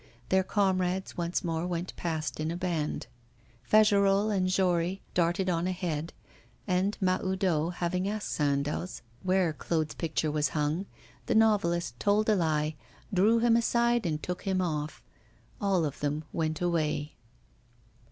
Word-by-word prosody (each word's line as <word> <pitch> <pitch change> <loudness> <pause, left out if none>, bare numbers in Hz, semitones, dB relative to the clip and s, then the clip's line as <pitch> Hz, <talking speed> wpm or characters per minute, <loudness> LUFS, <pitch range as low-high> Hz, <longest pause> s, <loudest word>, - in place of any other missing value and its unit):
Their 190 0 +4
comrades 185 -1 0
once 170 0 -1
more 165 0 -1
went 175 0 -3
past 160 -3 -3
in 155 +1 -1
a 170 - -3
band. 170 -4 -2 0.6
Fagerolles 205 - +4
and 185 -1 +1
Jory 185 0 +1
darted 175 +2 +1
on 175 -1 +1
ahead, 170 -4 -2 0.5
and, 190 +1 +1
Mahoudeau 185 -3 +1
having 180 +2 -1
asked 210 0 -3
Sandoz 145 +4 -1 0.2
where 185 -3 +2
Claude's 155 0 -1
picture 160 -2 -1
was 150 -1 +1
hung, 155 +6 0 0.4
the 235 - +1
novelist 175 - +2
told 210 +2 +2
a 215 - +5
lie, 155 -3 +1 0.4
drew 205 +5 +4
him 230 0 +4
aside 235 -2 +2
and 155 -2 -2
took 180 0 -3
him 190 -1 0
off. 155 -4 -2 0.6
All 195 -5 +2
of 145 - -4
them 150 +1 -1
went 160 -1 -1
away. 155 -4 0
180 Hz, 140 wpm, -29 LUFS, 160-195 Hz, 0.6 s, a